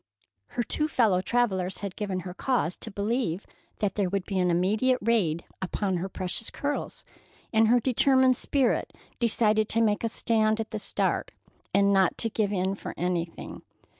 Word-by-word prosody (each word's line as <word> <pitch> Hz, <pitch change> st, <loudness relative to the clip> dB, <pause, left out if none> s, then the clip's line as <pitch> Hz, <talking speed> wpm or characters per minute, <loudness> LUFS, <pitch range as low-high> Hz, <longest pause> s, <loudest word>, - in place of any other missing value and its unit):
Her 240 Hz, -, +2 dB
two 305 Hz, +6 st, -1 dB
fellow 215 Hz, -11 st, +2 dB
travellers 190 Hz, -4 st, 0 dB
had 195 Hz, -, -5 dB
given 195 Hz, -3 st, -3 dB
her 180 Hz, 0 st, -7 dB
cause 215 Hz, -4 st, 0 dB
to -, -, -7 dB
believe 205 Hz, -2 st, -2 dB, 0.3 s
that 200 Hz, -2 st, -1 dB
there 200 Hz, -3 st, 0 dB
would 195 Hz, 0 st, -2 dB
be 195 Hz, -2 st, -2 dB
an 180 Hz, -1 st, +2 dB
immediate 210 Hz, +9 st, +2 dB
raid 195 Hz, -8 st, +1 dB
made -, -, -29 dB
upon 190 Hz, 0 st, -1 dB
her 185 Hz, +3 st, -3 dB
precious 185 Hz, +4 st, -3 dB
curls, 290 Hz, +1 st, -4 dB, 0.5 s
and 220 Hz, 0 st, +5 dB
her 245 Hz, +2 st, +5 dB
determined 260 Hz, +1 st, +3 dB
spirit 265 Hz, -2 st, 0 dB, 0.3 s
decided 215 Hz, -2 st, +3 dB
to 225 Hz, -, +2 dB
make 215 Hz, -2 st, +2 dB
a 230 Hz, -, +1 dB
stand 220 Hz, -1 st, +1 dB
at 220 Hz, -, -4 dB
the 215 Hz, -, -3 dB
start, -, -, -1 dB, 0.4 s
and 200 Hz, 0 st, +3 dB
not 190 Hz, -3 st, +3 dB
to 225 Hz, -, +1 dB
give 205 Hz, -2 st, 0 dB
in 190 Hz, -1 st, 0 dB
for 195 Hz, -, -7 dB
anything. 175 Hz, -1 st, -3 dB
210 Hz, 175 wpm, -27 LUFS, 185-230 Hz, 0.5 s, and